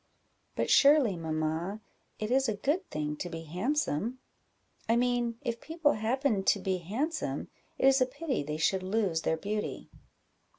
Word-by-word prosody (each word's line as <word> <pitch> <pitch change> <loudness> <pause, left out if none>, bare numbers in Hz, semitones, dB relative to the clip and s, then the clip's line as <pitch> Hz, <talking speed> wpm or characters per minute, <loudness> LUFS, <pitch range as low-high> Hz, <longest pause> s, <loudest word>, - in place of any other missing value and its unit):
"But - - 0
surely, 280 -8 +6
mamma, 160 +4 -2 0.4
it 215 +2 -3
is 265 -1 +3
a 215 - 0
good 305 - -1
thing 150 0 -2
to 175 - -4
be 165 -1 -6
handsome? 220 - -1 0.7
I 230 - +5
mean, 240 -1 +1
if 235 -3 -3
people 320 -2 +1
happen 225 -1 0
to 200 - +3
be 190 -1 -1
handsome, 255 - -3 0.3
it - - +1
is 270 0 +5
a 255 - +4
pity 280 - -2
they 150 +1 -4
should 185 +4 +1
lose 190 -4 0
their 160 - 0
beauty." 210 +5 -4
215 Hz, 160 wpm, -30 LUFS, 175-265 Hz, 0.7 s, surely